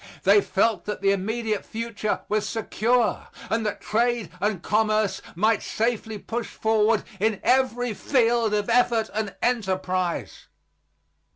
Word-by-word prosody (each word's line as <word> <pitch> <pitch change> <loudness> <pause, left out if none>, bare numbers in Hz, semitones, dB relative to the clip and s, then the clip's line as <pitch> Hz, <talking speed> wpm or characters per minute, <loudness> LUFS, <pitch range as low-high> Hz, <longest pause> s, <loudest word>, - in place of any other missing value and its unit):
They 200 +2 +6
felt 220 +3 +1
that 210 -2 -4
the 195 0 +3
immediate 215 +2 -1
future 220 -2 -3
was 210 0 0
secure, 225 +1 0 0.2
and 225 +1 +1
that 205 - -4
trade 235 -3 0
and 200 -3 -1
commerce 215 -1 +1
might 215 +4 +2
safely 220 -1 -2
push 230 +3 -4
forward 220 0 +1 0.2
in 215 -1 +1
every 245 -2 +2
field 230 -2 +2
of 205 -1 -1
effort 235 -2 +2
and 210 -1 -3
enterprise. 185 -6 -1
220 Hz, 125 wpm, -25 LUFS, 205-230 Hz, 0.2 s, They